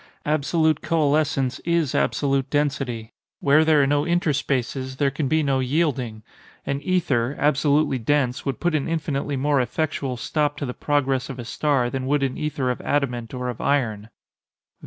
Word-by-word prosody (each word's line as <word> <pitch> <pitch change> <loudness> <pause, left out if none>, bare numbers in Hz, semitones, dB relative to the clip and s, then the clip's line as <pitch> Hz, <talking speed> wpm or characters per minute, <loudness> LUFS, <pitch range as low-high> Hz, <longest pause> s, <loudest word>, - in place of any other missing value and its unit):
Absolute 155 +1 +1
coalescence 145 -4 +1
is 170 -5 0
absolute 135 -1 +1
density. 135 -6 -1 0.3
Where 145 +3 +4
there 155 -2 +4
are - - +4
no 145 +1 +2
interspaces, 140 -6 -1
there 140 -1 +2
can 145 +1 -2
be 155 +2 +2
no 135 -2 +1
yielding. 130 -5 -1 0.4
An 140 0 -2
ether, 145 -7 0
absolutely 145 -1 +2
dense, 125 +1 0
would 135 -4 -3
put 175 -1 0
an 150 -3 0
infinitely 145 -3 -2
more 140 0 +2
effectual 135 0 -2
stop 145 +3 -1
to 145 - -3
the 125 - -4
progress 135 -3 0
of 135 - -6
a 120 - -6
star 130 -1 0
than 130 0 -3
would 145 0 +2
an 130 -1 -1
ether 145 -4 -1
of 125 - -5
adamant 125 -5 -1
or 125 0 -3
of 120 -2 -5
iron. 115 -7 0
140 Hz, 165 wpm, -23 LUFS, 130-150 Hz, 0.4 s, Where